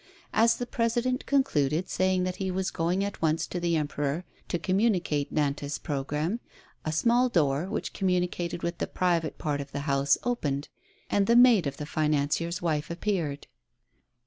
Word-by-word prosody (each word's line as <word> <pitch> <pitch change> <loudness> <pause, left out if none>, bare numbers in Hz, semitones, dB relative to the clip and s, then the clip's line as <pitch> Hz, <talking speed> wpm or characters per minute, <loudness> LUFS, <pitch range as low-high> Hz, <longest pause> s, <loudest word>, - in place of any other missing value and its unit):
As 230 +1 +4
the 245 - -3
President 240 +2 0
concluded, 170 - +1
saying 185 0 +1
that 185 0 -2
he 190 -1 -2
was 185 0 -1
going 175 +4 0
at 200 0 -4
once 160 0 +1
to 180 - -4
the 170 -1 +1
Emperor 150 +1 -1 0.2
to - - -1
communicate 180 -5 +1
Nantas' 145 -1 -1
programme, 150 - -2 0.4
a 155 - -2
small 240 +10 +3
door, 150 - +1
which - - -3
communicated 180 -2 -1
with 170 0 -2
the - - -1
private 170 -3 0
part 145 -2 -2
of 140 0 -9
the 140 - -2
house 140 -1 +2
opened, 145 - -1 0.4
and 200 -1 +1
the 235 - +4
maid 240 - +6
of 140 - -4
the 150 - -5
financier's 155 +3 0
wife 155 -3 0
appeared. 170 -5 -2
170 Hz, 165 wpm, -28 LUFS, 150-195 Hz, 0.4 s, maid